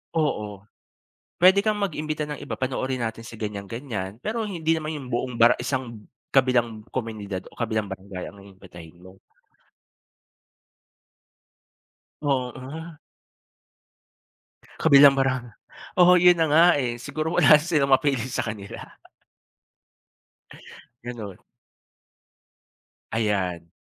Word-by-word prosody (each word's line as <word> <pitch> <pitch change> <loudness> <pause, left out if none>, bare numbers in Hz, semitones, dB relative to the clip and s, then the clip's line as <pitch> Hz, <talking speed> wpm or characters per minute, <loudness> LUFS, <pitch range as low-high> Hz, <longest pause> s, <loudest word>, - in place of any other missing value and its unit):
Oo, 105 -11 -2 0.8
puwede 190 +3 +6
kang 215 -1 0
mag-imbita 155 -5 -3
ng 150 - -4
iba, - - -5
panoorin 130 0 -2
natin 115 0 -4
sa 115 -1 -10
ganyan-ganyan. 105 0 -5
Pero 225 - -3
hindi 165 -5 -1
naman 155 0 -4
yung 140 -4 -7
buong 125 +1 -2
barang 115 +1 +5
isang 120 -5 -4 0.3
kabilang 120 -5 +2
komunidad 105 -6 -5
o - - -21
kabilang 110 -3 -2
barangay 95 -1 -7
ang 100 0 -14
iimbitahin 90 -4 -14
mo. 95 +1 -16 3.0
Oo. 140 +4 -4 1.8
Kabilang 140 -2 +7
barang 130 -2 0 0.6
oo, 180 +1 +7
yun 180 -1 +6
na 165 - +3
nga, 160 +3 +6
eh. 120 -4 -2
Siguro 155 +6 -3
wala 150 - +7
silang 155 -4 +1
mapili 135 -3 +2
sa 125 - -2
kanila. 105 -2 -7 2.2
Gano'n. 115 -6 -7 1.7
Ayan. 95 -6 -1
125 Hz, 105 wpm, -24 LUFS, 105-150 Hz, 3.0 s, Kabilang